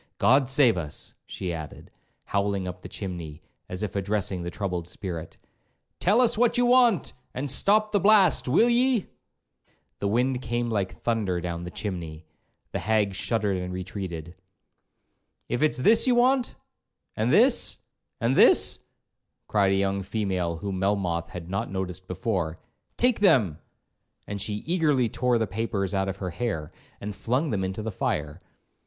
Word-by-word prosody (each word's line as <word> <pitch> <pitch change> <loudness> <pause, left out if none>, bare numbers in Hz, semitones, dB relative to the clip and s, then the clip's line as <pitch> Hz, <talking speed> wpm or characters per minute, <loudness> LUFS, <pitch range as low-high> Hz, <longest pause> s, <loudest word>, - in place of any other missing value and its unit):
—G 135 +3 +6
d 135 - -3
save 135 -5 +4
us!' 75 -2 -5
she 90 -2 -4
added, 80 -3 -8 0.3
howling 100 -2 -1
up 90 0 -7
the - - -9
chimney, 85 -6 -6 0.3
as 90 +3 -4
if 105 -3 -4
addressing 100 -2 -1
the 85 - -4
troubled 90 -3 -4
spirit; 90 -3 -6 0.6
'tell 210 +7 +4
us 235 -3 +3
what 240 0 +3
you 245 - +3
want, 240 - +4 0.2
and 135 +1 -2
stop 210 +9 +3
the 205 - +3
blast, 195 -7 +5
will 165 - +4
ye?'—The 240 - -3
wind 125 +4 +1
came 120 -1 -2
like 100 -4 -1
thunder 105 -7 0
down 85 0 -4
the - - -5
chimney; 85 -5 -6 0.5
the - - -2
hag 105 0 +1
shuddered 100 0 -1
and 90 0 -4
retreated. 90 -3 -6 1.1
'If 120 - -2
it's 155 -1 +2
this 220 - +4
you 250 - +4
want—and 250 +1 -1
this—and 120 +3 +1
this,' - - +5 0.7
cried 100 -2 +2
a - - +3
young 100 0 0
female 95 -4 -2
whom 95 +2 -4
Melmoth 90 -4 0
had 85 -2 -8
not 95 +2 -3
noticed 95 -1 -5
before, 90 -4 -2 0.4
'take 245 -1 +3
them;' 110 - +3 0.7
and 100 -1 -5
she 105 +1 -3
eagerly 150 -8 +2
tore 125 +2 +1
the 110 - +1
papers 100 -2 -2
out 95 0 0
of 95 - -4
her 95 -3 -4
hair, 85 -6 -3 0.3
and 105 0 -6
flung 125 +8 -1
them 95 -3 -1
into 95 +3 -3
the 110 - -3
fire. 75 -3 -3
100 Hz, 155 wpm, -26 LUFS, 90-130 Hz, 1.1 s, G